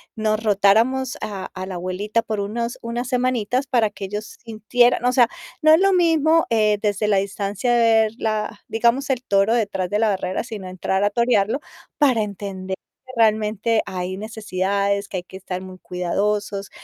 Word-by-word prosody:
nos 215 0 0
rotáramos 225 +5 +2
a 195 -3 -5
a 185 0 -4
la 190 - -6
abuelita 185 +5 -1
por 215 -2 -4
unos 235 +4 -3
una 235 +1 -3
semanitas 250 0 0
para 235 -5 +2
que 200 -1 -7
ellos 210 +2 -6
sintieran, 235 +2 +2
o 250 - +4
sea, 245 -2 +5 0.4
no 310 0 +7
es 320 - +6
lo 390 0 +4
mismo, 330 -3 +3
eh, 215 -2 +3
desde 210 0 0
la 205 -2 +3
distancia 200 +4 -1
ver, 225 -2 +4
la 215 -1 -2
digamos, 235 +5 +1
el 255 -1 0
toro 200 +2 +2
detrás 195 -5 -1
de 205 - 0
la 220 0 +2
barrera, 185 -1 -2
sino 210 -5 -7
entrar 190 +2 -1
a 205 - +3
torearlo 235 +2 +1 0.4
para 260 -6 +3
entender 195 -2 -5 0.3
que 255 - -10
realmente 220 0 +2
hay 185 0 -4
necesidades, 200 -2 -1
que 190 - -5
hay 175 - -4
que 190 - -11
estar 185 -1 -5
muy 185 0 -10
cuidadosos, 200 +3 -2
215 Hz, 175 wpm, -22 LUFS, 195-235 Hz, 0.4 s, no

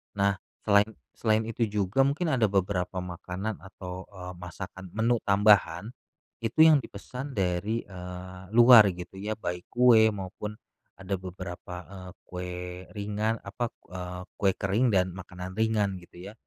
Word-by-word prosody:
Nah, 100 0 +2 0.2
selain 100 0 +5 0.2
selain 110 0 +1
itu 115 0 -1
juga 105 +3 -1
mungkin 155 +3 0
ada 120 -4 +3
beberapa 95 -2 0
makanan, 90 +4 -5
atau, 95 -1 -8
eee, 90 -2 -8
masakan 90 +1 -8
menu 115 +2 +2
tambahan, 100 -1 +4 0.5
itu 115 +7 +4
yang 155 -3 +7
dipesan 130 +5 -7
dari, 95 +4 0
eee, 90 0 -8
luar 120 -3 +9
gitu 90 +2 -9
ya, 105 +2 -2
baik 90 -4 -5
kue 120 -3 +6
maupun 100 +2 -6 0.4
ada 95 0 -3
beberapa, 90 -1 -7
eee, 95 -1 -10
kue 90 0 -6 0.4
ringan 105 +2 -1
apa, 115 +4 -3 0.2
eee, 90 0 -6 0.2
kue 95 -2 +3
kering 105 +3 +1
dan 90 0 +2
makanan 90 0 -8
ringan, 105 -4 +1
gitu 90 +3 -11
ya. - - -16
100 Hz, 140 wpm, -28 LUFS, 90-110 Hz, 0.5 s, luar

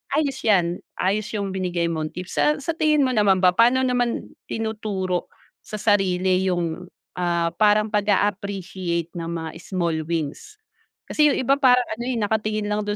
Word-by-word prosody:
ayos 280 -3 0
yan 180 -5 +3 0.2
ayos 205 +3 0
yung 200 -2 -2
binigay 175 -3 -1
mong 155 -1 -4
tips. 180 0 -5
Sa 300 - +4
sa 330 - -1
tingin 305 -3 +2
mo 260 - +1
naman 195 -5 +3
ba 180 - +7
paano 245 +7 +4
naman 245 -2 -1 0.2
tinuturo 210 -5 -3 0.3
sa - - -9
sarili 190 -3 +2
yung, 175 -1 -2 0.3
ah, 170 -1 0
parang 215 0 +4
pag-a 205 -2 +2
appreciate 185 -4 -4
ng 165 -1 -6
mga 165 -1 -4
small 170 -4 -2
wins? 165 - -4 0.5
Kasi 300 -1 +3
yung - - 0
iba 275 +2 +2
parang 250 -2 +5
ano 220 +2 -4
eh, 255 - -1
nakatingin 215 -1 -1
lang 210 - 0
dun 205 - -1
200 Hz, 165 wpm, -23 LUFS, 175-225 Hz, 0.5 s, ba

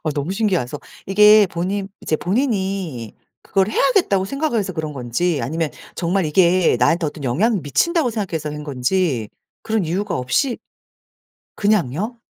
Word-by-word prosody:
아 155 - 0
너무 150 +6 -2
신기해서 185 - -1 0.3
이게 210 +1 +6
본인 190 +3 -2
이제 155 - -1
본인이 190 - -2 0.3
그걸 195 0 +1
해야겠다고 225 - +2
생각을 275 +1 -1
해서 190 -2 -2
그런 155 -2 -4
건지 140 +5 -1
아니면 155 +5 -2 0.2
정말 180 0 0
이게 175 -1 +3
나한테 165 +6 +2
어떤 145 -1 -6
영향을 195 - +1
미친다고 315 - +1
생각해서 170 -9 -3
한 150 0 -6
건지 135 - 0 0.3
그런 220 -4 0
이유가 190 +4 -2
없이 130 - 0 1.0
그냥요? 205 - 0
185 Hz, 330 characters per minute, -20 LUFS, 150-210 Hz, 1.0 s, 이게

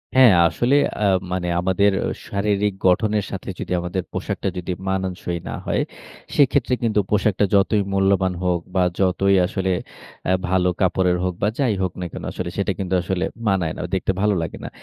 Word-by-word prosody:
হ্যাঁ। 130 -5 +8
আসলে 120 - +1 0.3
আ - - +3 0.3
মানে 90 -1 -1
আমাদের 95 +3 +2
অ্যা - - -1 0.2
শারীরিক 100 0 0
গঠনের 105 +2 +2
সাথে - - -6
যদি - - -5
আমাদের 90 +1 -3
পোশাকটা - - -2
যদি 90 +1 -4 0.2
মানানসই 95 -2 -2
না - - -4
হয়, - - +1 0.5
সেক্ষেত্রে 140 -2 +3
কিন্তু 110 -2 +2
পোশাকটা 105 -1 +2
যতই 100 +1 +3
মূল্যবান 95 -1 +2
হোক 90 -1 +1 0.2
বা, 95 - +4 0.2
যতই 95 +1 +3
আসলে 95 0 -1 0.5
অ্যা 95 - +3
ভালো 90 -1 +2
কাপড়ের 90 -1 +2
হোক 90 0 0
বা, 100 - +3
যাই 130 -6 +2
হোক 95 -1 0
না - - -2
কেন? - - -7
আসলে 90 -1 -4
সেটা 100 0 0
কিন্তু 95 -1 -2
আসলে 90 +1 -2 0.2
মানায় 90 -5 +1
না। - - -4
দেখতে 95 - 0
ভালো 105 0 +3
লাগে 80 - -5
না। - - -5
95 Hz, 180 wpm, -22 LUFS, 90-105 Hz, 0.5 s, হ্যাঁ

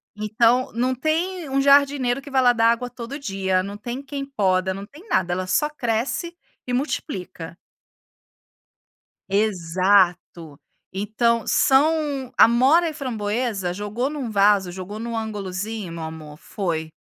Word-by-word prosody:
Então 230 +4 +2
não 250 +2 0
tem 320 +5 -2
um 270 +1 +1
jardineiro 275 -2 +3
que 285 - -11
vai 265 -1 +2
lá 245 -1 +5
dar 230 -1 +3
água 245 +1 -2
todo 245 +3 -7
dia, 195 -8 -1
não 200 +1 -6
tem 240 +5 -6
quem 280 0 -6
poda, 190 -8 0
não 195 +1 -7
tem 305 - -16
nada, 175 -1 +1
ela 185 +1 -3
só 185 +11 +2
cresce 270 +6 -2 0.3
e 250 - -2
multiplica. 190 - -4 1.7
Exato. 185 -5 +1 0.4
Então 220 +4 0
são 285 -2 +2
amora 265 +9 +5
e - - -7
framboesa, 220 -7 -2
jogou 210 +8 -3
em - - -6
um 260 -5 -4
vaso, 200 -3 +3
jogou 190 +4 -7
em 230 - -5
um 230 -1 -3
ângulozinho 205 -2 -4
meu 165 -1 -6
amor, 160 -2 -8
foi. 160 -3 -4
225 Hz, 145 wpm, -22 LUFS, 190-270 Hz, 1.7 s, lá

